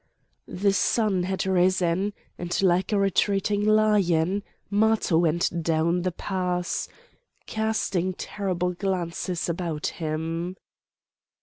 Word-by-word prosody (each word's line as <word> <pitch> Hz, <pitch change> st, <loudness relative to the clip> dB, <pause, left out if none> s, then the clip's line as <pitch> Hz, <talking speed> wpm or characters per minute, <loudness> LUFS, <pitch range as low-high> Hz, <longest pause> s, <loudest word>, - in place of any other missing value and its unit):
The 200 Hz, +2 st, +1 dB
sun 195 Hz, -1 st, +2 dB
had 190 Hz, +2 st, -2 dB
risen; 185 Hz, +1 st, +2 dB, 0.2 s
and, 175 Hz, +1 st, -2 dB
like 180 Hz, +1 st, +2 dB
a 210 Hz, -, +2 dB
retreating 200 Hz, +1 st, +1 dB
lion, 205 Hz, -4 st, +3 dB, 0.3 s
Matho 210 Hz, -5 st, +3 dB
went 170 Hz, +1 st, +1 dB
down 165 Hz, +2 st, +1 dB
the 185 Hz, +1 st, -1 dB
paths, 180 Hz, -1 st, -2 dB, 0.6 s
casting 215 Hz, -4 st, -1 dB
terrible 180 Hz, -3 st, -2 dB
glances 180 Hz, -2 st, -2 dB
about 170 Hz, -3 st, -3 dB, 0.2 s
him. 165 Hz, +3 st, -3 dB
185 Hz, 100 wpm, -25 LUFS, 170-200 Hz, 0.6 s, lion